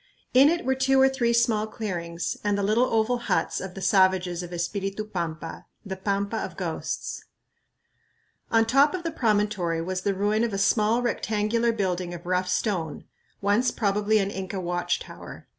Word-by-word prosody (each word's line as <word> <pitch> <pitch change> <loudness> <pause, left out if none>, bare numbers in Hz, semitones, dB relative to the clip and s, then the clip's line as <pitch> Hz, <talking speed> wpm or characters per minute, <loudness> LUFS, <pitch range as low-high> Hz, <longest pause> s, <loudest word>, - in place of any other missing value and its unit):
In 270 +3 +7
it 335 -4 -1
were 265 - +3
two 265 0 +2
or 265 - +7
three 260 -3 +1
small 230 -2 +2
clearings 175 -6 -4
and 205 -1 +1
the 200 - -1
little 215 +5 +3
oval 225 +2 +2
huts 235 - -1
of 190 -1 -7
the 195 - -6
savages 185 -2 +3
of 175 -1 -8
Espiritu 195 +4 -3
Pampa, 165 -5 -5 0.2
the 190 -1 -4
"Pampa 200 +3 -1
of - - -5
Ghosts." - - -4 1.2
On 225 0 +4
top 275 +7 +4
of 360 - -5
the 330 - -2
promontory 210 - 0
was 185 +2 -3
the 200 0 0
ruin 210 +3 +1
of 235 -3 -1
a - - -1
small, 215 +4 +2
rectangular 230 0 0
building 185 -5 -2
of 170 +1 -11
rough 180 0 0
stone, 175 -8 -1 0.4
once 205 +5 +2
probably 210 0 +1
an 200 -1 0
Inca 190 0 -4
watch 175 0 -1
tower. - - -11
205 Hz, 175 wpm, -26 LUFS, 185-230 Hz, 1.2 s, In